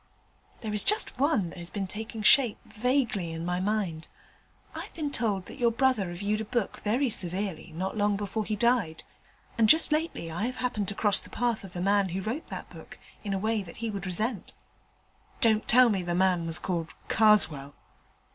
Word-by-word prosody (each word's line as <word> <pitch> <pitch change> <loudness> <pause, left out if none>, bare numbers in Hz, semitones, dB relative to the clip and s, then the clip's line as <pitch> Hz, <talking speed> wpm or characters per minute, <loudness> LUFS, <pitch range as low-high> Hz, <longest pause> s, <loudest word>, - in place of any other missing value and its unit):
'There 215 -3 -4
is 210 - +1
just 425 +1 +2
one 265 - +1
that - - -10
has 170 0 -6
been 200 -1 -3
taking 220 +3 -6
shape 245 0 +5
vaguely 230 -7 -1
in 165 +1 -5
my 180 0 -1
mind. 185 -5 -2 0.7
I've - - -6
been 300 -3 -3
told 205 -8 0
that - - -11
your 240 -1 +4
brother 250 -5 +1
reviewed 200 +5 -2
a - - -2
book 235 -2 -2
very 240 +5 +1
severely 185 -2 -2
not 190 +4 -3
long 205 -1 +1
before 205 +2 -3
he 215 +1 -2
died, 210 -7 +1 0.6
and 220 -1 +5
just 315 0 +6
lately 305 - -1
I 205 +8 -2
have 255 - -4
happened 245 -6 -2
to 200 - -4
cross 205 -1 +4
the - - -8
path 235 -2 -1
of 195 - -10
the 175 - -4
man 200 0 +2
who 185 +3 -3
wrote 235 - -4
that - - -8
book - - -12 0.3
in 205 - -4
a 195 - 0
way 215 +2 0
he 215 +5 -6
would 195 -2 -5
resent.' 210 +2 -2 0.8
'Don't 220 -2 +3
tell 250 +1 +6
me 195 -4 0
the 175 -1 -2
man 180 -2 +2
was 165 0 0
called 170 -3 -3 0.2
Karswell.' 160 -11 +3
210 Hz, 195 wpm, -28 LUFS, 185-230 Hz, 0.8 s, just